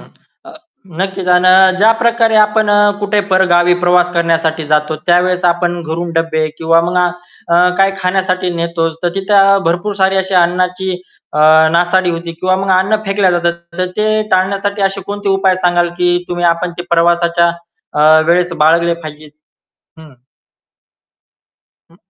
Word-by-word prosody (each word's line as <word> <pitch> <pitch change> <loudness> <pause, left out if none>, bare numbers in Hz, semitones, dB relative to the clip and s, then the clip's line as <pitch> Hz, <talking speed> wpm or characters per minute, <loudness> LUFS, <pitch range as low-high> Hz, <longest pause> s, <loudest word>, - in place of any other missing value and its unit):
हं. - - -18 0.4
अ, 345 -1 -13 0.4
नक्कीच 190 -1 -4
आणि 185 +1 +4
ज्या 220 +3 +4
प्रकारे 235 -1 +1
आपण 215 0 +2
अ, 205 0 +3
कुठे 205 0 0
परगावी 175 -1 +3
प्रवास 180 0 +2
करण्यासाठी 165 -2 -1
जातो 150 +1 -1
त्यावेळेस 180 +1 +1
आपण 175 0 0
घरून 165 +2 -5
डब्बे 165 -1 -1
किंवा 165 +1 +2
मग 175 +2 -3
अ, 180 - +3 0.7
काही 195 0 +3
खाण्यासाठी 185 0 -1
नेतोच, 165 -1 -3
तर 175 - +1
तिथे 195 0 +3
भरपूर 175 +5 -2
सारी 190 0 +2
अशी 190 0 -2
अन्नाची 180 +1 0 0.4
अ, - - -3 0.3
नासाडी 175 +1 +1
होती 170 0 -6
किंवा 185 +3 -1
मग 195 0 -3
अन्न 195 +3 +1
फेकले 195 -1 +1
जातात. 175 -1 0 0.3
तर 185 - 0
ते 215 0 0
टाळण्यासाठी 200 +2 -1
असे 195 0 -1
कोणते 205 0 -5
उपाय 195 -1 +1
सांगाल, 175 -1 0
की 175 0 +1
तुम्ही 175 0 -3
आपण 175 +1 -5
ते - - -4
प्रवासाच्या 170 0 +1 0.4
अ, 155 +1 +4
वेळेस 175 +1 +1
बाळगले 170 +2 +2
पाहिजेत? 155 -2 -11 0.7
हं. 155 -4 -15 1.8
हं. 170 - -23
180 Hz, 150 wpm, -13 LUFS, 170-195 Hz, 1.8 s, आणि